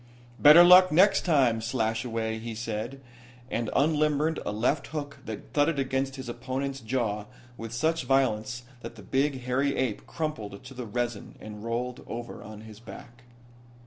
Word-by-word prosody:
"Better 155 Hz, +4 st, +9 dB
luck 180 Hz, +1 st, +8 dB
next 195 Hz, +5 st, +4 dB
time, 130 Hz, -9 st, +3 dB
Slashaway," 110 Hz, -1 st, -2 dB
he 115 Hz, 0 st, -6 dB
said, 115 Hz, +4 st, -5 dB, 0.5 s
and 115 Hz, -1 st, -1 dB
unlimbered 150 Hz, +1 st, +2 dB
a -, -, -3 dB
left 125 Hz, +7 st, 0 dB
hook 145 Hz, -2 st, -6 dB
that 110 Hz, -2 st, -8 dB
thudded 145 Hz, +1 st, +2 dB
against 135 Hz, 0 st, -1 dB
his 130 Hz, -2 st, -8 dB
opponent's 130 Hz, +3 st, -4 dB
jaw 110 Hz, -3 st, -2 dB, 0.3 s
with 115 Hz, -1 st, -8 dB
such 160 Hz, +4 st, 0 dB
violence 125 Hz, -3 st, 0 dB, 0.2 s
that 115 Hz, 0 st, -8 dB
the 105 Hz, -, -12 dB
big, 135 Hz, +2 st, 0 dB
hairy 130 Hz, +3 st, 0 dB
ape 125 Hz, -5 st, -2 dB
crumpled 110 Hz, -11 st, -5 dB
to 130 Hz, +1 st, -11 dB
the 125 Hz, -2 st, -7 dB
resin 120 Hz, -1 st, -4 dB
and 105 Hz, -1 st, -9 dB
rolled 120 Hz, +2 st, -3 dB
over 120 Hz, 0 st, -7 dB
on 110 Hz, 0 st, -10 dB
his 110 Hz, -1 st, -12 dB
back. 120 Hz, +1 st, -13 dB
125 Hz, 155 wpm, -27 LUFS, 115-140 Hz, 0.5 s, Better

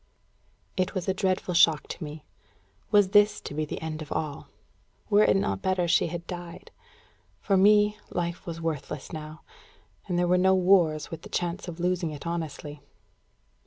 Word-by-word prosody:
It 185 Hz, +1 st, -1 dB
was 185 Hz, -1 st, -3 dB
a 190 Hz, -, +2 dB
dreadful 185 Hz, -1 st, -1 dB
shock 165 Hz, -3 st, +4 dB
to -, -, -6 dB
me. 150 Hz, +1 st, -8 dB, 0.6 s
Was 205 Hz, -3 st, +4 dB
this 205 Hz, +1 st, +4 dB
to -, -, -7 dB
be 155 Hz, +1 st, -1 dB
the -, -, -6 dB
end 155 Hz, -1 st, -4 dB
of 155 Hz, -, -9 dB
all? 150 Hz, -3 st, -3 dB, 0.6 s
Were 205 Hz, +1 st, +6 dB
it -, -, +4 dB
not 95 Hz, -, 0 dB
better 185 Hz, -2 st, 0 dB
she 170 Hz, -, +3 dB
had 170 Hz, -1 st, -6 dB
died? 175 Hz, -1 st, -8 dB, 0.7 s
For 200 Hz, -, +1 dB
me, 210 Hz, +2 st, +4 dB
life 175 Hz, 0 st, -4 dB
was 165 Hz, -1 st, -5 dB
worthless 150 Hz, -3 st, -4 dB
now. 155 Hz, 0 st, -8 dB, 0.6 s
And 180 Hz, -3 st, -1 dB
there 175 Hz, 0 st, +2 dB
were 180 Hz, +1 st, +3 dB
no 190 Hz, +1 st, +4 dB
wars, 180 Hz, -5 st, +3 dB
with 165 Hz, -1 st, -6 dB
the -, -, -11 dB
chance 175 Hz, +2 st, -3 dB
of 175 Hz, -1 st, -7 dB
losing 175 Hz, -1 st, 0 dB
it 150 Hz, 0 st, -8 dB
honestly. 155 Hz, -3 st, -5 dB
175 Hz, 175 wpm, -27 LUFS, 155-185 Hz, 0.7 s, Were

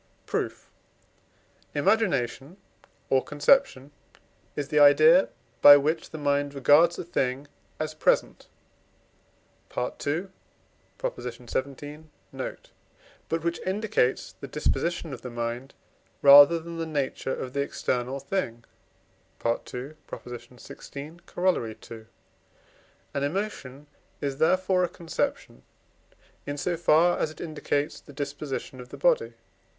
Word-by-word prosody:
Proof. -, -, -3 dB, 1.1 s
Imagination 150 Hz, -, 0 dB, 0.5 s
or 130 Hz, -1 st, +4 dB
conception 145 Hz, -, +2 dB, 0.6 s
is 145 Hz, -1 st, -3 dB
the 150 Hz, -, +2 dB
idea, 155 Hz, +5 st, +7 dB, 0.3 s
by 145 Hz, 0 st, +11 dB
which 155 Hz, +3 st, -1 dB
the 160 Hz, -, -8 dB
mind 145 Hz, -1 st, 0 dB
regards 150 Hz, +5 st, +5 dB
a -, -, -4 dB
thing 135 Hz, -4 st, -2 dB, 0.3 s
as 155 Hz, 0 st, -3 dB
present 155 Hz, -, +1 dB, 1.3 s
(II. -, -, 0 dB
xvii. 150 Hz, -, -6 dB, 0.3 s
note), -, -, -7 dB, 0.6 s
but 165 Hz, 0 st, -1 dB
which 170 Hz, 0 st, -1 dB
indicates 190 Hz, -, 0 dB
the -, -, -7 dB
disposition 165 Hz, +1 st, -1 dB
of 125 Hz, -, -8 dB
the 125 Hz, -, -7 dB
mind 120 Hz, +2 st, -5 dB, 0.5 s
rather 145 Hz, +4 st, +9 dB
than 170 Hz, +1 st, -8 dB
the 165 Hz, -, -2 dB
nature 140 Hz, -3 st, -2 dB
of 125 Hz, -, -6 dB
the 140 Hz, -, 0 dB
external 130 Hz, -1 st, -2 dB
thing 135 Hz, -6 st, -3 dB, 0.8 s
(II. 115 Hz, -, +4 dB
xvi. 125 Hz, +3 st, -9 dB
Coroll. 175 Hz, -10 st, 0 dB, 0.2 s
ii.). 110 Hz, -1 st, -9 dB, 1.1 s
An 140 Hz, -, -1 dB
emotion 145 Hz, -5 st, -4 dB, 0.3 s
is 140 Hz, -1 st, -3 dB
therefore 185 Hz, +3 st, +3 dB
a 175 Hz, -, 0 dB
conception, 165 Hz, -2 st, -4 dB, 0.9 s
in 145 Hz, 0 st, -3 dB
so 175 Hz, +4 st, -1 dB
far 170 Hz, +1 st, +3 dB
as -, -, 0 dB
it 155 Hz, -, -13 dB
indicates 150 Hz, -2 st, -2 dB
the 145 Hz, -, -15 dB
disposition 140 Hz, -2 st, -5 dB
of 125 Hz, -, -12 dB
the -, -, -9 dB
body. -, -, +2 dB
145 Hz, 115 wpm, -27 LUFS, 135-170 Hz, 1.3 s, by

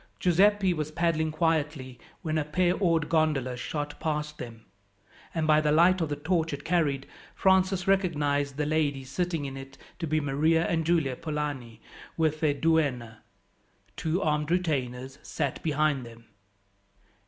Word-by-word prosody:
Giuseppi 190 Hz, +2 st, +3 dB
was 155 Hz, -2 st, -3 dB
paddling 160 Hz, -1 st, 0 dB
quietly, 155 Hz, -5 st, -1 dB, 0.2 s
when 155 Hz, -1 st, 0 dB
a -, -, 0 dB
pair 175 Hz, +4 st, +1 dB
oared 165 Hz, -5 st, +1 dB
gondola 150 Hz, -6 st, +1 dB
shot 145 Hz, +4 st, -5 dB
past 150 Hz, -1 st, -3 dB
them, 115 Hz, -2 st, -9 dB, 0.7 s
and 160 Hz, -1 st, 0 dB
by 155 Hz, 0 st, +4 dB
the 150 Hz, -1 st, +1 dB
light 175 Hz, +4 st, +5 dB
of 160 Hz, -, -1 dB
the 145 Hz, -, -1 dB
torch 160 Hz, +1 st, -1 dB
it 145 Hz, +1 st, -6 dB
carried, 150 Hz, -6 st, +1 dB, 0.3 s
Francis 190 Hz, 0 st, +2 dB
recognized 145 Hz, -7 st, +1 dB
the 150 Hz, -, 0 dB
ladies 145 Hz, -4 st, -1 dB
sitting 170 Hz, -3 st, -1 dB
in 135 Hz, -1 st, -5 dB
it 135 Hz, 0 st, -10 dB, 0.2 s
to 165 Hz, -, -3 dB
be 155 Hz, +1 st, +1 dB
Maria 155 Hz, +3 st, +2 dB
and 165 Hz, -2 st, 0 dB
Giulia 160 Hz, -7 st, +2 dB
Polani 145 Hz, -7 st, -4 dB, 0.4 s
with 155 Hz, -1 st, +1 dB
their 150 Hz, -2 st, +2 dB
duenna; 140 Hz, -8 st, 0 dB, 0.7 s
two 165 Hz, -, -1 dB
armed 150 Hz, -1 st, 0 dB
retainers 135 Hz, -7 st, -1 dB
sat -, -, -3 dB
behind 150 Hz, -3 st, +1 dB
them. 115 Hz, -1 st, -13 dB
155 Hz, 150 wpm, -28 LUFS, 140-165 Hz, 0.7 s, light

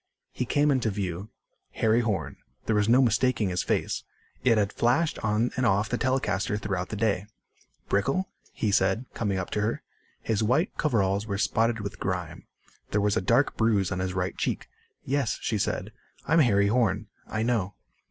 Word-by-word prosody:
He 125 Hz, -, -3 dB
came 145 Hz, +4 st, +2 dB
into 130 Hz, -5 st, +1 dB
view. 95 Hz, -1 st, -4 dB, 0.4 s
Harry 110 Hz, +1 st, +3 dB
Horn. 95 Hz, -, -2 dB, 0.3 s
There 110 Hz, -, +1 dB
was 105 Hz, +1 st, +2 dB
no 130 Hz, +3 st, +6 dB
mistaking 120 Hz, -3 st, +2 dB
his 90 Hz, 0 st, 0 dB
face. -, -, -1 dB, 0.4 s
It 115 Hz, -3 st, +4 dB
had 100 Hz, -2 st, +1 dB
flashed 130 Hz, +8 st, +1 dB
on 110 Hz, +2 st, +1 dB
and 130 Hz, -, -1 dB
off 105 Hz, -2 st, +2 dB
the 125 Hz, -, 0 dB
telecaster 105 Hz, -6 st, 0 dB
throughout 95 Hz, -3 st, -3 dB
the -, -, -4 dB
day. 105 Hz, -2 st, 0 dB, 0.6 s
"Brickel?" 135 Hz, -, +1 dB, 0.3 s
he 105 Hz, -, -1 dB
said, 100 Hz, +5 st, +2 dB
coming 100 Hz, -4 st, -1 dB
up 95 Hz, -, -4 dB
to 105 Hz, -, 0 dB
her. 110 Hz, +2 st, -1 dB, 0.4 s
His 110 Hz, -1 st, 0 dB
white 130 Hz, -, +1 dB
coveralls 100 Hz, -7 st, +1 dB
were 100 Hz, -2 st, -2 dB
spotted 115 Hz, +2 st, +1 dB
with 100 Hz, 0 st, -6 dB
grime. 90 Hz, -3 st, -4 dB, 0.4 s
There 105 Hz, -, +1 dB
was 105 Hz, 0 st, +2 dB
a -, -, +1 dB
dark 120 Hz, +9 st, +2 dB
bruise 105 Hz, -5 st, +2 dB
on 90 Hz, -, -2 dB
his 95 Hz, 0 st, -2 dB
right 90 Hz, -1 st, -1 dB
cheek. -, -, -2 dB, 0.4 s
"Yes," 135 Hz, -4 st, 0 dB
she 110 Hz, -, -1 dB
said. -, -, -2 dB, 0.4 s
"I'm 165 Hz, -, +4 dB
Harry 100 Hz, -8 st, +4 dB
Horn." 110 Hz, -3 st, +1 dB, 0.2 s
"I 110 Hz, 0 st, -2 dB
know." 110 Hz, -5 st, 0 dB
105 Hz, 180 wpm, -27 LUFS, 100-120 Hz, 0.6 s, no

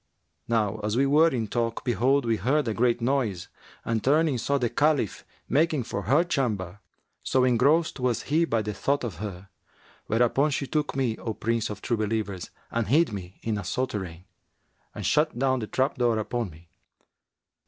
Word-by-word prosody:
Now 110 Hz, -2 st, 0 dB
as 105 Hz, +2 st, -1 dB
we 135 Hz, -, +4 dB
were 150 Hz, +4 st, +5 dB
in 120 Hz, -7 st, -2 dB
talk, 115 Hz, +1 st, -2 dB
behold, 130 Hz, +3 st, +2 dB
we 115 Hz, -1 st, +1 dB
heard 140 Hz, +4 st, +1 dB
a 110 Hz, -, 0 dB
great 120 Hz, +1 st, +1 dB
noise 115 Hz, -8 st, -1 dB, 0.4 s
and 115 Hz, -2 st, -1 dB
turning, 145 Hz, -1 st, +3 dB
saw 140 Hz, +4 st, +1 dB
the 125 Hz, -3 st, +1 dB
Caliph 145 Hz, -3 st, +1 dB, 0.2 s
making 150 Hz, 0 st, +2 dB
for 100 Hz, -, -4 dB
her 135 Hz, -, +3 dB
chamber, 105 Hz, -, -2 dB, 0.4 s
so 130 Hz, -1 st, +2 dB
engrossed 135 Hz, +7 st, +3 dB
was 125 Hz, -2 st, 0 dB
he 155 Hz, +4 st, +2 dB
by 115 Hz, -8 st, 0 dB
the 105 Hz, 0 st, -3 dB
thought 140 Hz, +8 st, 0 dB
of 110 Hz, -9 st, -4 dB
her; 95 Hz, -1 st, -7 dB, 0.6 s
whereupon 120 Hz, +6 st, +2 dB
she 140 Hz, -1 st, -1 dB
took 150 Hz, +1 st, -1 dB
me, 125 Hz, -5 st, 0 dB
O 110 Hz, -2 st, -4 dB
Prince 115 Hz, -1 st, -1 dB
of 105 Hz, -1 st, -7 dB
True 120 Hz, -, 0 dB
Believers 105 Hz, -4 st, -2 dB, 0.2 s
and 115 Hz, -2 st, -1 dB
hid 150 Hz, +1 st, +3 dB
me 95 Hz, -2 st, -8 dB
in 110 Hz, -2 st, -1 dB
a -, -, -4 dB
souterrain[FN#362] 95 Hz, -5 st, -3 dB, 0.7 s
and -, -, -5 dB
shut 155 Hz, -2 st, +2 dB
down 130 Hz, 0 st, +1 dB
the 110 Hz, -, -4 dB
trap 130 Hz, +3 st, 0 dB
door 120 Hz, -2 st, +2 dB
upon 115 Hz, 0 st, -2 dB
me. 80 Hz, +1 st, -17 dB
120 Hz, 180 wpm, -26 LUFS, 105-135 Hz, 0.7 s, were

